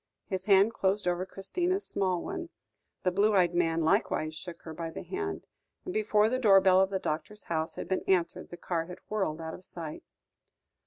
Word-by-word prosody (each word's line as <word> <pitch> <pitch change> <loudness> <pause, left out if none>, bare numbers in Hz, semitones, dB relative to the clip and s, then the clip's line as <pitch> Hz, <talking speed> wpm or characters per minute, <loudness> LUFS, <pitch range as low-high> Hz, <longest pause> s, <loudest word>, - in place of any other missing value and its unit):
His 190 -1 -3
hand 200 +2 +5
closed 195 -1 +1
over 180 +1 0
Christina's 355 - -1
small 185 -3 0
one, 355 -2 -5 0.5
the 185 - +2
blue 205 +3 +3
eyed 180 -2 +4
man 165 -1 +1
likewise 155 0 +1
shook 170 +2 -9
her 160 - -7
by 165 0 -4
the 160 - -7
hand, 400 +1 -4 0.4
and 365 - -4
before 220 - +3
the 255 +3 0
door 200 -6 +7
bell 190 -1 +5
of 190 - +2
the 195 - -1
doctor's 185 +5 -4
house 160 -1 -2
had - - -5
been 190 - 0
answered, 180 -3 +1
the 175 - -8
car 165 -1 -2
had 180 - -8
whirled 190 -7 -1
out 160 0 -5
of 185 - -10
sight. 165 -4 -7
190 Hz, 200 wpm, -30 LUFS, 170-210 Hz, 0.5 s, door